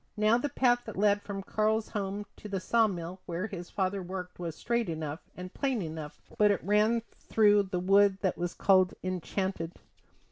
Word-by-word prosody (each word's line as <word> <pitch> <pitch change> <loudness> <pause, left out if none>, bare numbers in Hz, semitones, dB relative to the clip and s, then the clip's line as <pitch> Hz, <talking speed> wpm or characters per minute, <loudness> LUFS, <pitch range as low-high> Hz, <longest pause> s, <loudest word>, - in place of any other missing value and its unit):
Now 215 +2 +4
the 290 - -1
path 245 -2 +2
that 220 - -7
led 205 0 +3
from 195 -1 -6
Karl's 215 +2 0
home 205 -1 -3
to 210 - -9
the 195 -1 -1
saw 225 +4 +3
mill 180 -1 -5
where 175 +3 -2
his 175 -5 -7
father 195 0 -1
worked 180 0 -6
was 170 -3 -4
straight 235 0 -1
enough, 155 -1 -4 0.2
and 180 0 -7
plain 265 -7 -1
enough, 155 -2 -7 0.2
but 210 -1 +6
it 200 - +1
ran 215 +4 +3 0.2
through 210 -2 +4
the 180 - -1
wood 195 +1 +4
that 190 - +1
was 175 0 -3
called 185 -2 +4
Enchanted. 185 -1 -2
195 Hz, 185 wpm, -30 LUFS, 180-210 Hz, 0.2 s, but